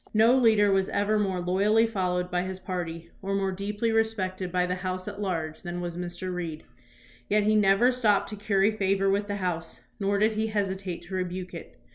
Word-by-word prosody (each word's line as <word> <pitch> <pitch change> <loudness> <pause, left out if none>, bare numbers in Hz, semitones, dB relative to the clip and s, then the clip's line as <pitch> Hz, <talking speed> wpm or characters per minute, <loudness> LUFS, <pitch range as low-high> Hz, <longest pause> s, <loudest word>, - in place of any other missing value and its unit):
No 225 +3 +6
leader 220 -5 +4
was 195 0 +2
ever 210 +1 +1
more 190 -3 0
loyally 200 +5 +3
followed 180 -4 -1
by 180 0 +1
his 185 0 -5
party 170 -3 -5
or 195 0 -2
more 195 -1 0
deeply 205 +4 -2
respected 190 -5 -1
by 180 0 +2
the 180 - -1
House 185 0 -4
at 205 0 -6
large 160 -5 -3
than 175 -1 -5
was 175 -1 -4
Mr. 175 +1 -4
Reed; 165 -3 -5 0.7
yet 210 0 +3
he 215 +1 +3
never 210 +4 +5
stooped 225 -5 +2
to 210 - -5
curry 200 0 +2
favor 195 -2 +1
with 200 +1 0
the 205 - -2
House 175 -4 -3 0.2
nor 200 0 +1
did 215 +2 +3
he 220 +1 0
hesitate 190 -4 -2
to 175 +3 -11
rebuke 185 0 -3
it. - - -10
195 Hz, 200 wpm, -27 LUFS, 180-210 Hz, 0.7 s, No